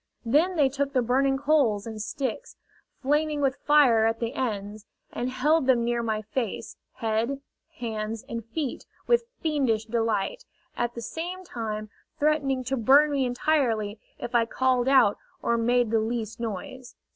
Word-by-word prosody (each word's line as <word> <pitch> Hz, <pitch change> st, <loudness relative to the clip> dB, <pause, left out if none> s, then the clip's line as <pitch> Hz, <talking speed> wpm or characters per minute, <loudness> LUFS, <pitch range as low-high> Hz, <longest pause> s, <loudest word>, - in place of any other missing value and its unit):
Then 310 Hz, +10 st, +3 dB
they 290 Hz, -4 st, +4 dB
took 280 Hz, +1 st, -2 dB
the 255 Hz, -2 st, +2 dB
burning 270 Hz, +3 st, +2 dB
coals 270 Hz, -8 st, +2 dB
and 220 Hz, -2 st, -6 dB
sticks, 255 Hz, +2 st, -4 dB, 0.5 s
flaming 295 Hz, +2 st, +1 dB
with 275 Hz, -1 st, +1 dB
fire 255 Hz, -7 st, +5 dB
at 225 Hz, 0 st, -1 dB
the 230 Hz, +1 st, -2 dB
ends, 210 Hz, -4 st, -4 dB, 0.3 s
and 245 Hz, -, -2 dB
held 285 Hz, +3 st, +2 dB
them 245 Hz, -3 st, +4 dB
near 240 Hz, 0 st, 0 dB
my 220 Hz, -2 st, -2 dB
face, 225 Hz, +1 st, -4 dB, 0.2 s
head, 225 Hz, +5 st, -1 dB, 0.4 s
hands 220 Hz, -2 st, -4 dB
and 230 Hz, -1 st, -5 dB
feet, 265 Hz, +5 st, -4 dB, 0.2 s
with 475 Hz, 0 st, +3 dB, 0.2 s
fiendish 265 Hz, -9 st, +1 dB
delight, 230 Hz, -, -1 dB, 0.3 s
at 240 Hz, 0 st, -2 dB
the 235 Hz, -, -6 dB
same 355 Hz, +8 st, -5 dB
time 215 Hz, -, -5 dB, 0.3 s
threatening 280 Hz, -3 st, +1 dB
to 265 Hz, +2 st, -2 dB
burn 280 Hz, +6 st, +5 dB
me 275 Hz, -2 st, +1 dB
entirely 245 Hz, -6 st, 0 dB, 0.2 s
if 240 Hz, -, -6 dB
I 230 Hz, -1 st, +3 dB
called 255 Hz, 0 st, +1 dB
out 260 Hz, -7 st, +5 dB, 0.2 s
or 235 Hz, -, +2 dB
made 240 Hz, 0 st, +2 dB
the 225 Hz, -, +3 dB
least 225 Hz, 0 st, -3 dB
noise. 235 Hz, +3 st, -6 dB
245 Hz, 155 wpm, -26 LUFS, 225-280 Hz, 0.5 s, fire